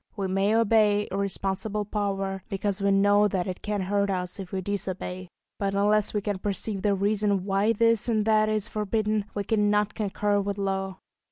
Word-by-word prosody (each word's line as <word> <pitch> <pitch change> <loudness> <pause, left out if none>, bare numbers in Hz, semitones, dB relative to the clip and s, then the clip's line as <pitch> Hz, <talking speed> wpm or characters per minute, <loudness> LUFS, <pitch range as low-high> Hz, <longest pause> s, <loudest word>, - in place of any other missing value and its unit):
We 200 -3 -2
may 195 +3 +1
obey 215 -2 +3
irresponsible 200 +1 -2
power, 195 -2 -2
because 200 0 -2
we 200 - +2
know 205 +1 +4
that 185 -3 -1
it 185 -1 -5
can 210 -1 -2
hurt 200 +1 0
us 180 0 -3
if 190 -2 -7
we 190 - -2
disobey; 185 -1 -4 0.3
but 200 -1 -1
unless 210 +1 +2
we 210 - -1
can 200 -1 -2
perceive 200 0 -3
the 205 -1 +2
reason 200 -1 +1
why 200 +2 +2
this 230 +1 +2
and 215 -2 +1
that 215 -1 +3
is 215 -1 0
forbidden, 215 -1 -1
we 205 - -1
cannot 210 0 +1
concur 205 0 0
with 200 0 -3
law. 195 -1 -2
200 Hz, 180 wpm, -26 LUFS, 195-210 Hz, 0.3 s, know